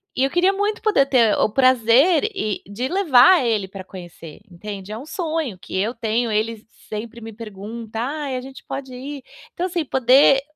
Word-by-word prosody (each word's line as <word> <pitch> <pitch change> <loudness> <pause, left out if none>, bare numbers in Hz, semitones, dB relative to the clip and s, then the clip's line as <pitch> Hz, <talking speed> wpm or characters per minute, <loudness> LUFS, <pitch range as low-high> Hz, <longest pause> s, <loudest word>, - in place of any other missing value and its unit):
E 260 - +1
eu 270 - +1
queria 355 +2 +3
muito 410 +2 -2
poder 420 -11 +3
ter 240 -6 +3
o - - +3
prazer, 260 +6 +4
e 215 - -3
de 215 +6 -4
levar 315 -3 +5
ele 215 -4 0
pra 190 0 -9
conhecer, 175 -4 -11
entende, 195 +2 -8
é 215 - -5
um 255 - -9
sonho 315 - -3
que 185 - -6
eu 210 +5 0
tenho. 230 0 -1
Ele 220 +1 -2 0.2
sempre 230 +2 -6
me 225 0 -8
pergunta: 220 +1 -8
"Ai, 280 +1 -3
a 255 - -3
gente 265 +1 -12
pode 265 -2 -6
ir?" 275 +2 -7 0.3
Então, 360 +1 -2
assim, 345 -3 -2
poder 265 +1 +4
245 Hz, 190 wpm, -21 LUFS, 215-285 Hz, 0.3 s, levar